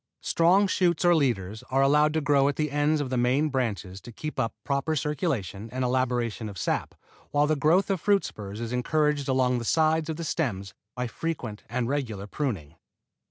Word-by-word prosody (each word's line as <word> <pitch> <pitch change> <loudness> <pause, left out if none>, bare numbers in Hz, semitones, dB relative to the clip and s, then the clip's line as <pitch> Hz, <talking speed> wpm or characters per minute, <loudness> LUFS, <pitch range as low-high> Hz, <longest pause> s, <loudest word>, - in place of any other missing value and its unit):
Strong 180 +5 +4
shoots 180 -3 +1
or 175 - +6
leaders 110 - 0
are 135 +1 +3
allowed 150 +2 +4
to 160 +1 0
grow 140 -1 +3
at 145 - 0
the 150 -2 -1
ends 145 +1 +2
of 130 -3 -4
the 130 - 0
main 130 +5 +2
branches 105 -8 -3
to 120 - -10
keep 155 +6 -6
up 115 - 0
a - - -58
proper 140 +3 0
circulation 130 - -2
and 130 0 -2
elaboration 120 -3 -1
of 100 - -9
sap, - - -2 0.3
while 145 0 +2
the 155 +1 +2
growth 165 +8 +3
of 190 -4 -1
fruit 200 -1 +3
spurs 105 0 -7
is 115 +1 -4
encouraged 150 +3 +1
along 130 -1 +2
the - - -5
sides 160 +4 +2
of 160 - -2
the 170 - -5
stems 105 - -2 0.2
by 125 0 -2
frequent 120 -5 -4
and 120 0 -1
regular 120 -8 -2
pruning. 100 - -3
135 Hz, 200 wpm, -27 LUFS, 115-155 Hz, 0.3 s, or